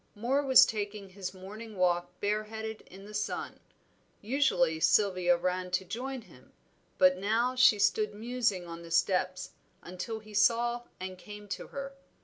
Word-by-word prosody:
Moor 245 Hz, +7 st, +1 dB
was 265 Hz, -1 st, +7 dB
taking 205 Hz, -2 st, -4 dB
his 185 Hz, 0 st, -6 dB
morning 205 Hz, +3 st, -10 dB
walk 175 Hz, 0 st, 0 dB
bareheaded 215 Hz, +1 st, -3 dB
in 195 Hz, +2 st, -13 dB
the 210 Hz, -, -11 dB
sun. 210 Hz, 0 st, -3 dB, 0.6 s
Usually 195 Hz, -, +1 dB
Sylvia 185 Hz, -1 st, +3 dB
ran 180 Hz, +1 st, -2 dB
to 180 Hz, +1 st, -1 dB
join 255 Hz, +6 st, -5 dB
him, -, -, -19 dB, 0.4 s
but 185 Hz, 0 st, +5 dB
now 225 Hz, +5 st, +1 dB
she 255 Hz, -4 st, +6 dB
stood 210 Hz, +1 st, +1 dB
musing 225 Hz, -4 st, -1 dB
on 170 Hz, 0 st, -8 dB
the 170 Hz, -, -11 dB
steps, 185 Hz, +1 st, 0 dB, 0.3 s
until 185 Hz, +6 st, -5 dB
he 215 Hz, -1 st, -13 dB
saw 235 Hz, +3 st, +2 dB, 0.2 s
and 185 Hz, 0 st, -6 dB
came 210 Hz, 0 st, -10 dB
to -, -, -5 dB
her. 275 Hz, 0 st, -6 dB
205 Hz, 150 wpm, -30 LUFS, 185-225 Hz, 0.6 s, was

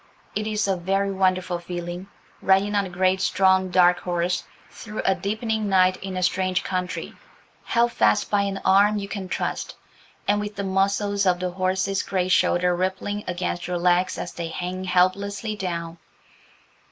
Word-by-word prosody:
It 215 Hz, +1 st, -1 dB
is 210 Hz, -1 st, 0 dB
a 195 Hz, -, +2 dB
very 195 Hz, +3 st, 0 dB
wonderful 185 Hz, -2 st, 0 dB
feeling, 175 Hz, +1 st, -6 dB, 0.3 s
riding 195 Hz, +2 st, +3 dB
on 200 Hz, -2 st, +1 dB
a -, -, -9 dB
great 185 Hz, +1 st, +1 dB
strong, 190 Hz, -1 st, +3 dB
dark 180 Hz, -1 st, +4 dB
horse, 175 Hz, 0 st, -1 dB, 0.3 s
through 215 Hz, -1 st, -6 dB
a 195 Hz, -, +4 dB
deepening 215 Hz, +3 st, -2 dB
night 185 Hz, -1 st, +4 dB
in 190 Hz, -1 st, -6 dB
a 185 Hz, -, -1 dB
strange 185 Hz, +1 st, +1 dB
country, 185 Hz, -1 st, -3 dB, 0.5 s
held 235 Hz, 0 st, +2 dB
fast 105 Hz, -, +2 dB
by 205 Hz, -1 st, +3 dB
an 200 Hz, -1 st, -2 dB
arm 200 Hz, +2 st, +5 dB
you 200 Hz, -1 st, -4 dB
can 200 Hz, -2 st, -6 dB
trust, -, -, -3 dB, 0.5 s
and 205 Hz, +1 st, +3 dB
with 210 Hz, 0 st, -5 dB
the 200 Hz, -, -3 dB
muscles 200 Hz, +1 st, +1 dB
of 180 Hz, 0 st, +2 dB
a 180 Hz, -, -1 dB
horse's 185 Hz, +1 st, 0 dB
great 185 Hz, -1 st, -1 dB
shoulder 180 Hz, 0 st, +3 dB
rippling 190 Hz, +3 st, -2 dB
against 175 Hz, -1 st, -3 dB
your 180 Hz, 0 st, -1 dB
legs 180 Hz, +1 st, +2 dB
as 175 Hz, -, -5 dB
they 170 Hz, -1 st, -4 dB
hang 180 Hz, +2 st, -4 dB
helplessly 200 Hz, +4 st, +1 dB
down. 170 Hz, -4 st, -4 dB
190 Hz, 165 wpm, -24 LUFS, 180-200 Hz, 0.5 s, arm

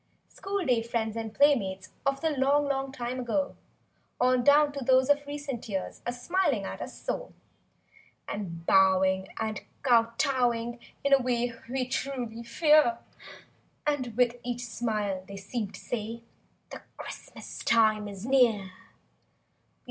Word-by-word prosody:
School 395 Hz, -2 st, -3 dB
day 245 Hz, -3 st, +3 dB
friends 225 Hz, -1 st, -2 dB
and 225 Hz, -1 st, -4 dB
playmates 200 Hz, -9 st, +2 dB, 0.2 s
of 275 Hz, 0 st, 0 dB
The 320 Hz, -1 st, +1 dB
long, 285 Hz, +1 st, +2 dB
long 270 Hz, -1 st, -1 dB
time 250 Hz, -1 st, -4 dB
ago; 255 Hz, +4 st, -1 dB, 0.6 s
On 250 Hz, 0 st, +3 dB
down 290 Hz, +2 st, +6 dB
to 280 Hz, -1 st, -5 dB
those 260 Hz, +2 st, +4 dB
of 290 Hz, 0 st, +1 dB
recent 285 Hz, -5 st, -5 dB
years 190 Hz, -2 st, -4 dB
Are -, -, +1 dB
smiling 265 Hz, -, 0 dB
at -, -, -6 dB
us -, -, -7 dB
so; -, -, -4 dB, 0.9 s
And 170 Hz, -5 st, -5 dB
bowing 190 Hz, 0 st, +4 dB
and 220 Hz, -2 st, -2 dB, 0.2 s
kowtowing 240 Hz, -1 st, +2 dB, 0.2 s
in 280 Hz, 0 st, +3 dB
A 275 Hz, -, +7 dB
way 245 Hz, -1 st, 0 dB, 0.2 s
we 255 Hz, 0 st, -1 dB
truly 250 Hz, -4 st, -3 dB
fear. 290 Hz, 0 st, +4 dB, 0.9 s
And 255 Hz, -6 st, -1 dB
with 245 Hz, -1 st, +3 dB
each 245 Hz, 0 st, -3 dB
smile 215 Hz, -5 st, -2 dB
they 200 Hz, -, -8 dB
seem 210 Hz, +1 st, -4 dB
to -, -, -11 dB
say— 230 Hz, 0 st, -5 dB, 0.5 s
"The -, -, -8 dB, 0.2 s
Christmas -, -, -9 dB
time 215 Hz, -2 st, +3 dB
is 200 Hz, 0 st, -7 dB
near." 235 Hz, -8 st, +3 dB
240 Hz, 140 wpm, -28 LUFS, 220-275 Hz, 0.9 s, A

